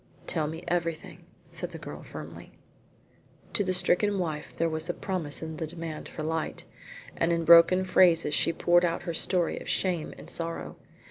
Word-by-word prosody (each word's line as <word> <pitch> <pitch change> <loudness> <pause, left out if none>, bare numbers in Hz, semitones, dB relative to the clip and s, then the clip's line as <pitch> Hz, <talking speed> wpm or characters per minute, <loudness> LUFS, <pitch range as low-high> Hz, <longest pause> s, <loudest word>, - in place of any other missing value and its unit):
"Tell 155 -3 0
me 160 +3 -6
everything," 170 -2 -3 0.3
said - - -5
the - - -6
girl - - -8
firmly. - - -10 1.0
To 205 - +1
the 185 - -1
stricken 195 +2 +2
wife 155 -5 -3
there 165 - +2
was 160 +1 -3
a 175 - -1
promise 170 -7 -2
in 160 -1 -6
the 160 - -3
demand 165 -1 -6
for 155 - -6
light, 160 0 -3 0.5
and 165 - +1
in 165 -1 0
broken 170 +3 +7
phrases 175 -4 +4
she - - +3
poured 175 +1 +3
out 170 -1 0
her 170 -1 -3
story 175 +1 0
of - - -8
shame 175 -4 0
and - - -11
sorrow. 165 0 -5
170 Hz, 180 wpm, -28 LUFS, 160-175 Hz, 1.0 s, broken